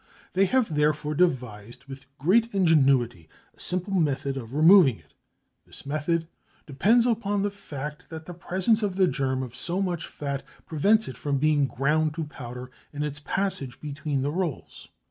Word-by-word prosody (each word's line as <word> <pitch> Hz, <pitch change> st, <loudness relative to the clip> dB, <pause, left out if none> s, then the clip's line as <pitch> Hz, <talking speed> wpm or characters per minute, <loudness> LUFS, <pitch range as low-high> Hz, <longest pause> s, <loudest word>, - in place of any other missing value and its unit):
They 195 Hz, +2 st, +4 dB
have 225 Hz, -4 st, +1 dB
therefore 150 Hz, 0 st, +1 dB
devised 125 Hz, -, -1 dB
with 135 Hz, 0 st, -11 dB
great 220 Hz, -, +3 dB
ingenuity 135 Hz, -, +3 dB, 0.3 s
a -, -, -28 dB
simple 180 Hz, +2 st, -3 dB
method 140 Hz, -6 st, 0 dB
of 125 Hz, -1 st, -7 dB
removing 160 Hz, -, +6 dB
it. -, -, -25 dB, 0.5 s
This -, -, -12 dB
method 155 Hz, +3 st, -1 dB, 0.4 s
depends 215 Hz, -, +3 dB
on 205 Hz, -4 st, 0 dB
the 205 Hz, -, 0 dB
fact 150 Hz, -7 st, -8 dB
that 160 Hz, 0 st, -8 dB
the 175 Hz, -, -8 dB
presence 185 Hz, +6 st, 0 dB
in 205 Hz, -3 st, -1 dB
the 190 Hz, 0 st, +3 dB
germ 130 Hz, -3 st, -1 dB
of 125 Hz, -2 st, -8 dB
so 175 Hz, +9 st, -3 dB
much 175 Hz, -4 st, -2 dB
fat 140 Hz, -2 st, -4 dB, 0.2 s
prevents 205 Hz, +8 st, +2 dB
it 130 Hz, -, -7 dB
from 145 Hz, -2 st, -1 dB
being 150 Hz, -1 st, +2 dB
ground 150 Hz, +4 st, 0 dB
to 165 Hz, -, -2 dB
powder 125 Hz, -4 st, -8 dB, 0.2 s
in 145 Hz, 0 st, -4 dB
its 145 Hz, -1 st, -4 dB
passage 145 Hz, -7 st, -2 dB
between 145 Hz, -1 st, -3 dB
the 145 Hz, -, -1 dB
rolls. 170 Hz, -3 st, -4 dB
150 Hz, 165 wpm, -26 LUFS, 135-185 Hz, 0.5 s, removing